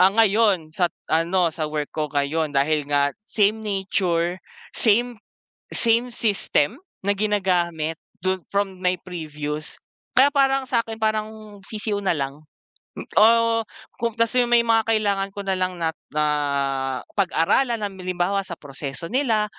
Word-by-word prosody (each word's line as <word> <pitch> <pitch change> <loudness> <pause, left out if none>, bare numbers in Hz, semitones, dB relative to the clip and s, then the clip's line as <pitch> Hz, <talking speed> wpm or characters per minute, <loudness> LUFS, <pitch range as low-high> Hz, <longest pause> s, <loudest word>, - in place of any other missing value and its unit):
ah, 185 - +8
ngayon 205 -6 +3
sa 175 +1 +2 0.2
ano, 170 +2 +2
sa 155 -1 -3
work 150 -1 -3
ko 155 -1 -1
ngayon 145 +2 0
dahil 150 +2 +2
nga 145 -1 +2 0.2
same 215 +1 +2
nature, 185 -4 0 0.4
same 240 +2 +3 0.6
same 235 +2 +3
system 200 -10 +1 0.3
na 200 - +2
ginagamit 180 -6 0 0.3
dun 185 0 0
from 200 -2 -1
my 180 0 +1
previous 150 -3 -4 0.4
kaya 265 +3 +7
parang 270 -1 +2
sa'kin 230 -2 -1
parang 215 -1 -2
sisiw 210 -1 -2
na 190 - +2
lang. 140 0 -3 0.6
M - - -6 0.2
oh, 230 +1 +5 0.4
kung 235 -1 0
kasi 230 +2 +3
may 240 -1 +6
mga 225 -1 +3
kailangan 200 -3 +1
ko 200 0 -6
na 195 - +1
lang 185 -1 -2
na 160 -1 0 0.2
na 150 0 +2 0.9
pag-aralan. 200 +6 +2
Halimbawa, 185 0 -1
sa 175 -3 -8
proseso 140 +2 -5
nila 230 -5 +2
195 Hz, 140 wpm, -23 LUFS, 165-220 Hz, 0.9 s, ah